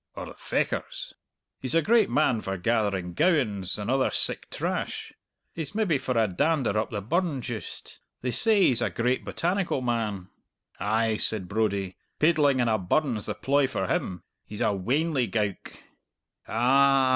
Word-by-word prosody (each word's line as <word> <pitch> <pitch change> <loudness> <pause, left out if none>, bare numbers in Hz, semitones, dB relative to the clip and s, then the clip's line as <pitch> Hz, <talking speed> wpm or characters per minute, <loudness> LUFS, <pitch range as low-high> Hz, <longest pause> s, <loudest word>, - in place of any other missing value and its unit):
"Or - - -6
the - - -10
Fechars?" - - -3 0.5
"He's 130 +4 +1
a 165 - +4
great 225 -1 +4
man 130 -7 +2
for 95 -1 -3
gathering 100 -3 0
gowans 110 - +1
and 105 - -5
other 135 0 +2
sic - - 0
trash. - - -3 0.4
He's 165 +4 -5
maybe 195 -10 +1
for 130 -2 -2
a 110 -1 +3
dander 135 - +1
up 110 +1 0
the 105 -2 -4
burn 155 - -1
juist. 115 -3 -7 0.2
They 125 - 0
say 215 - +4
he's 125 -8 +3
a - - +1
great 125 +2 0
botanical 175 -6 -1
man." 110 -6 -2 0.5
"Ay," 110 +1 +1
said 105 -5 +2
Brodie, 100 -3 -1 0.2
"paidling 150 -4 +3
in 120 - +2
a 110 -1 +2
burn's 115 - 0
the - - -3
ploy 140 0 +2
for 95 -7 -2
him. 90 -1 -2 0.2
He's 105 +1 -7
a 105 - +2
weanly 130 - 0
gowk." 105 -4 -2 0.7
"A - - -11
a - - -4
ah!" 135 +2 +4
120 Hz, 170 wpm, -26 LUFS, 105-145 Hz, 0.7 s, a